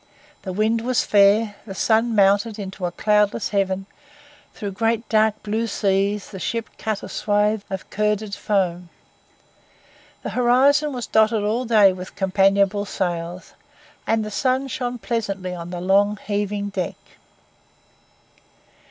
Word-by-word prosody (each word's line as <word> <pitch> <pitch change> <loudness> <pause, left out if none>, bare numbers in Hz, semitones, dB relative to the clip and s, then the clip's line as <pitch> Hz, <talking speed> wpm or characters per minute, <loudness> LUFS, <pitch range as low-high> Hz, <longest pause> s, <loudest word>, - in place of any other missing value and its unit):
The 190 - -5
wind 220 +4 +1
was 250 +1 +1
fair; 205 +1 +4
the 195 - -7
sun 225 +3 +2
mounted 205 +2 +3
into 190 -2 -4
a - - -5
cloudless 210 +2 +1
heaven; 195 -1 -1 0.7
through 205 -2 -6
great 225 +3 -1
dark 215 -1 +2
blue 220 +2 -1
seas 200 -1 0
the 190 - -7
ship 230 +3 -3
cut 220 -2 -3
a - - -6
swath 210 0 0
of 190 -1 -5
curded 210 0 -1
foam. 180 -5 -1 1.3
The - - -4
horizon 270 +5 +3
was 245 -3 -4
dotted 220 -1 +2
all 225 +5 0
day 210 -5 +5
with 185 0 -9
companionable 195 +1 +2
sails, 175 -2 -4 0.5
and 220 -1 +1
the 215 - -6
sun 260 +4 0
shone 245 0 -3
pleasantly 195 -4 -3
on 170 -1 -7
the 175 0 -5
long, 200 +3 +2
heaving 205 0 -2
deck. 185 -4 -3
205 Hz, 135 wpm, -22 LUFS, 195-225 Hz, 1.3 s, day